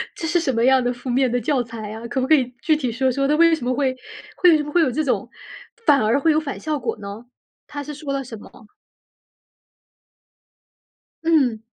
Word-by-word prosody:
这 325 - -4
是 345 +2 +2
什 325 -5 0
么 230 0 +1
样 260 -1 +4
的 245 - 0
负 245 +1 -8
面 255 0 +2
的 245 - +1
教 255 +2 0
材 225 -3 -8
啊？ 225 +2 -7
可 260 - -2
不 260 - -1
可 315 - +4
以 255 -3 -1
具 315 - +2
体 265 -5 -2
说 260 +2 0
说 275 +2 0
他 300 - +2
为 335 0 +5
什 280 -6 -7
么 255 - +1
会 260 -1 0 0.5
为 340 -3 +7
什 295 - -2
么 295 - -7
会 350 - +3
有 305 - +2
这 310 +6 -1
种 275 - -1 0.6
反 280 -2 +5
而 220 +6 +2
会 320 +3 +3
有 305 - +3
反 295 -3 -6
效 310 -2 -2
果 235 -3 -3
呢？ 200 +3 -8 0.4
他 290 -1 -6
是 295 - -7
说 290 -1 -5
了 275 0 -2
什 230 -3 -9
么 - - -13
吗？ 235 -4 -17 2.6
嗯。 275 -9 +2
265 Hz, 245 characters per minute, -21 LUFS, 245-300 Hz, 2.6 s, 为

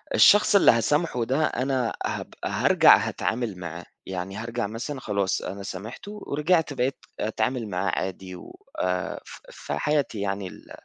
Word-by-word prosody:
الشخص 210 0 +6
اللي 200 - +8
هاسامحه 125 +2 +1
ده 135 +6 +1
أنا 130 -2 0
هابقى - - -5
هارجع - - +6
هاتعامل 115 -4 -2
معاه، 85 0 -7 0.2
يعني 95 +1 -5
هارجع 115 0 -3
مثلًا 120 +6 -5
خلاص 100 -4 -1
أنا 100 0 -6
سامحته 105 - -7
ورجعت 155 +1 +1
بقيت 130 0 -1 0.2
أتعامل 110 +1 -1
معاه 95 +1 -1
عادي 95 0 -5
و 90 - -12 0.2
آآ 90 0 -1
ف - - -11
في - - -6
حياتي 145 -8 0
يعني 100 -1 -2
ال 90 - -13
115 Hz, 150 wpm, -25 LUFS, 95-135 Hz, 0.2 s, اللي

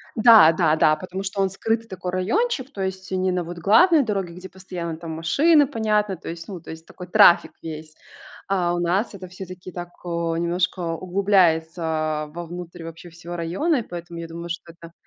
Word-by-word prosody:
Да, 220 -7 +8
да, 160 -2 +2
да, 155 -1 +4
потому 185 +2 -6
что 195 +1 -2
он 190 - +2
скрытый 225 +4 -2
такой 180 -1 -5
райончик, 270 - -1
то 195 - -7
есть 190 0 -4
не 185 0 0
на 180 -1 -1
вот 175 +1 -8
главной 300 - +5
дороге, 195 -6 -3
где 185 +2 -10
постоянно 175 -3 -6
там 165 -1 -7
машины, 285 - +3
понятно, 210 - 0
то - - -9
есть, 165 0 -7
ну, 190 -4 -7
то - - -10
есть 160 0 -10
такой 180 -1 -11
трафик 175 0 +6
весь. 155 -1 -8 0.5
А 180 -3 +1
у 175 - -1
нас 185 +6 0
это 185 -2 -9
всё-таки 185 0 -9
так, 175 0 -7 0.2
а, 170 -1 -2
немножко 175 +2 -1
углубляется 160 -4 +1
вовнутрь 175 0 -8
вообще 165 +1 -10
всего 170 +1 -9
района, 190 - 0
и - - 0
поэтому 175 -2 -8
я 165 - -6
думаю, 170 +1 -8
что 170 -1 -6
это 170 0 -14
180 Hz, 190 wpm, -23 LUFS, 170-195 Hz, 0.5 s, Да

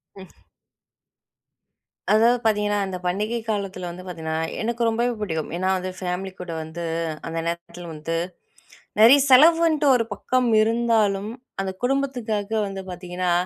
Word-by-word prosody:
ம். 190 -2 -12 1.8
அதாவது 230 +3 +5
பார்த்தீங்கன்னா, 210 -2 +1
அந்த 190 -1 -4
பண்டிகை 210 +6 -1
காலத்தில 195 -4 -3
வந்து 180 +1 -9
பார்த்தீங்கன்னா 160 -3 -4 0.3
எனக்கு 235 +2 -2
ரொம்பவே 235 +2 0
பிடிக்கும். 160 -6 -2
ஏன்னா 185 +1 0
வந்து 185 0 -4
ஃபேமிலி 185 +1 -3
கூட 180 -2 -6
வந்து 160 +2 -7 0.4
அந்த 165 0 -3
நேரத்தில 170 +1 -5
வந்து 155 +2 -4 0.8
நிறைய 235 +6 +8
செலவுன்ட்டு 315 +2 +6
ஒரு 235 - +2
பக்கம் 255 +2 0
இருந்தாலும் 220 -3 +1 0.3
அந்த 190 -1 -2
குடும்பத்துக்காக 245 -6 -1 0.2
வந்து 195 -1 -6
பார்த்தீங்கன்னா, 180 0 -3
200 Hz, 125 wpm, -23 LUFS, 180-235 Hz, 1.8 s, நிறைய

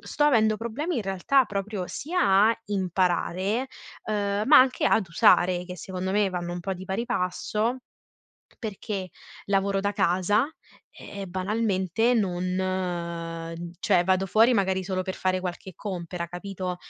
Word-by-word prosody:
sto 295 - -1
avendo 220 -6 +4
problemi, 255 +9 -3
in 225 - -1
realtà, 195 +8 +2
proprio 200 -1 -3
sia 215 - +2
a 230 0 0
imparare, 190 +4 0 0.4
uhm, 205 -1 -1
ma 295 +1 +9
anche 255 0 +3
ad 205 -5 +2
usare, 175 +1 +4
che 180 0 -8
secondo 185 +2 -4
me 205 -1 +3
vanno 175 -1 -4
un 175 - -4
po' 190 +2 -3
di 185 +1 -9
pari 190 +5 -2
passo, 210 +7 -1 0.8
perché 200 -3 -5 0.4
lavoro 195 0 +1
da 205 +1 -1
casa 195 +3 +2 0.5
e 200 -1 -8
banalmente 195 +3 0
non 175 -3 -2
cioè 180 -4 +3
vado 190 +1 +2
fuori 225 +6 +5
magari 190 -2 +1
solo 185 -1 -2
per 190 0 -4
fare 185 0 0
qualche 180 0 -6
compera, 175 -3 -5
capito? 180 0 -5
190 Hz, 140 wpm, -26 LUFS, 180-210 Hz, 0.8 s, ma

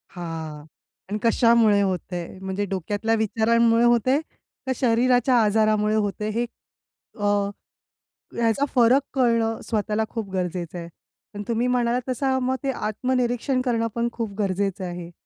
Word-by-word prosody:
हां, 160 -3 -6 0.4
आणि 210 - -1
कशामुळे 230 -3 +4
होतंय? 180 -2 -2
म्हणजे 190 +1 -2
डोक्यातल्या 205 +4 -1
विचारांमुळे 230 +1 +2
होतंय 240 +3 +3 0.5
का 265 - -1
शरीराच्या 245 +1 +3
आजारामुळे 215 0 +2
होतंय? 210 0 -1
हे 230 +3 -1 0.8
अ 205 -1 +2 0.9
याचा 235 +4 +2
फरक 250 +2 +5
कळणं 230 -3 +1
स्वतःला 215 -1 0
खूप 220 -4 -5
गरजेचं 180 -2 -3
आहे, 170 - -7 0.5
पण 205 - -6
तुम्ही 235 +1 0
म्हणालात 245 0 +1
तसं 260 +1 0
मग 255 +1 0
ते 275 - 0
आत्मनिरीक्षण 250 +3 -1
करणं 230 -3 0
पण 235 0 0
खूप 225 -3 -4
गरजेचं 195 -1 -1
आहे. 175 -1 -7
225 Hz, 130 wpm, -24 LUFS, 200-240 Hz, 0.9 s, फरक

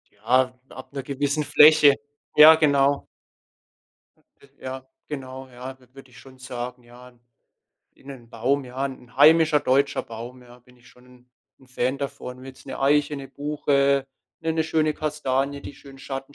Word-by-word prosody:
Ja, 125 +4 +1 0.2
ab 130 - -11
gewissen 145 +2 -2
'ner - - -10
Fläche. 150 0 +6 0.4
Ja, 155 +1 +9
genau. 140 -2 +2 1.4
J 140 - -20
Ja, 130 0 -8 0.2
genau, 130 -2 -8
ja, 130 +1 -9
w 125 - -23
würde 135 -1 -14
ich 125 - -17
schon 130 -1 -16
sagen. 125 0 -7
Ja, 120 +1 -15 0.9
in 135 - -24
'nen 125 -4 -11
Baum, 130 +4 -1
ja, 130 +2 -5
'n 130 -3 -8
heimischer 155 +1 +5
deutscher 140 +2 +1
Baum, 120 +3 -10
ja, 120 0 -17
bin 125 0 -24
ich 125 0 -21
schon 125 0 -21
'n 125 0 -21 0.3
'n 130 - -21
Fan 130 +1 -2
davon. 130 -2 -6
Ob 130 - -13
jetzt 130 0 -13
'ne - - -7
Eiche, 145 +1 +2
'ne 135 -1 -9
Buche, 140 -1 0 0.3
'ne 160 0 -1
'ne 160 0 0
schöne 155 -1 0
Kastanie, 140 -2 -2
die - - -9
schön 135 -1 -15
Schatten 135 +1 -7
135 Hz, 170 wpm, -23 LUFS, 125-145 Hz, 1.4 s, Ja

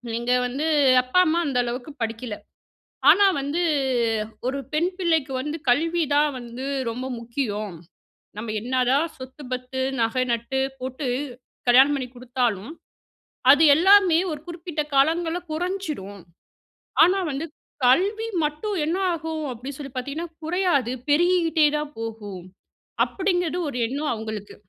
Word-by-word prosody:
நீங்க 240 +1 -1 0.2
வந்து 275 +5 -3 0.4
"அப்பா, 255 +8 +2
அம்மா 330 +2 +2
அந்த 270 -3 -1
அளவுக்கு 245 +4 -5
படிக்கல." 225 0 -3 0.8
ஆனா 405 +2 +6 0.2
வந்து 295 +6 -1 0.8
ஒரு 275 +2 -1
பெண் 340 +4 +1
பிள்ளைக்கு 320 -6 +1
வந்து 300 +4 -3
கல்வி 330 +6 +2
தான் 295 0 +4
வந்து 240 +2 -8 0.3
ரொம்ப 250 +3 -5
முக்கியம். 215 -5 -3 0.6
நம்ம 215 +1 -4
என்னதான் 255 +5 +2
சொத்து, 260 +3 -10
பத்து, 255 +1 -3 0.2
நக 230 +3 +1
நட்டு 235 +3 -1 0.2
போட்டு 260 +2 -4 0.6
கல்யாணம் 265 +4 +6
பண்ணி 260 -2 -3
குடுத்தாலும், 245 -2 -2 0.8
அது 290 +3 +6
எல்லாமே 370 0 +6
ஒரு 295 - -7
குறிப்பிட்ட 335 -2 -4
காலங்கள்ல 325 +5 +2
குறைஞ்சிரும். 310 - -4 0.8
ஆனா 370 +3 +3
வந்து 280 +4 -3 0.4
கல்வி 400 - +3 0.2
மட்டும் 305 +8 -2
என்ன 330 +4 0 0.2
ஆகும் 320 -1 -4
அப்டின்னு 260 +4 -8
சொல்லி 275 -3 -8
பார்த்தீங்கன்னா, 280 +7 -4 0.2
குறையாது 320 -8 +1 0.2
பெருகிக்கிட்டே 330 0 +3
தான் 300 0 -4
போகும். 215 -5 -6 0.6
அப்படிங்கற 360 -3 -1
ஒரு 270 - -5
எண்ணம் 285 +5 -2
அவங்களுக்கு 220 -2 -6
280 Hz, 125 wpm, -24 LUFS, 245-330 Hz, 0.8 s, ஆனா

